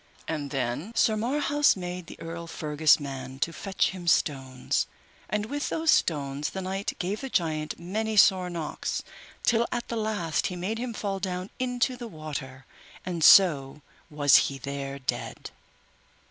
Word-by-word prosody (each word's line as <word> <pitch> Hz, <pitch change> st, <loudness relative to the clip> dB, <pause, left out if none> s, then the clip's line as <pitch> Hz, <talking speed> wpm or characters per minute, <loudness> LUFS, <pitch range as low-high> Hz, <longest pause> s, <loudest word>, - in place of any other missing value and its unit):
And 150 Hz, -3 st, -3 dB
then 135 Hz, -, -3 dB
Sir 220 Hz, -1 st, +3 dB
Marhaus 290 Hz, +6 st, +2 dB
made 180 Hz, -2 st, -6 dB
the -, -, -11 dB
Earl 165 Hz, 0 st, -6 dB
Fergus' 155 Hz, -1 st, +3 dB
man 135 Hz, -2 st, -6 dB
to 165 Hz, +4 st, -1 dB
fetch 190 Hz, +4 st, 0 dB
him 180 Hz, -2 st, -8 dB
stones, 135 Hz, -5 st, +1 dB, 0.4 s
and 210 Hz, +1 st, -1 dB
with 290 Hz, +6 st, -3 dB
those 325 Hz, 0 st, +2 dB
stones 145 Hz, -2 st, +1 dB
the 190 Hz, -, -5 dB
knight 195 Hz, +2 st, -2 dB
gave 195 Hz, +3 st, -3 dB
the 270 Hz, -, -5 dB
giant 155 Hz, -6 st, -1 dB
many 215 Hz, +5 st, -2 dB
sore 185 Hz, -2 st, +5 dB
knocks, 165 Hz, -3 st, -3 dB, 0.4 s
till 235 Hz, 0 st, +3 dB
at 240 Hz, -1 st, -3 dB
the 235 Hz, -, -2 dB
last 210 Hz, -8 st, -1 dB
he 180 Hz, -, -5 dB
made 195 Hz, +6 st, -3 dB
him 240 Hz, -2 st, -4 dB
fall 195 Hz, -2 st, -2 dB
down 185 Hz, 0 st, -4 dB
into 250 Hz, 0 st, 0 dB
the 240 Hz, -1 st, -6 dB
water, 145 Hz, -6 st, -7 dB, 0.4 s
and 175 Hz, -3 st, -2 dB
so 150 Hz, -6 st, +6 dB, 0.3 s
was 145 Hz, -3 st, +5 dB
he 140 Hz, -, -6 dB
there 140 Hz, 0 st, -5 dB
dead. 130 Hz, -, -4 dB
175 Hz, 160 wpm, -27 LUFS, 145-215 Hz, 0.4 s, so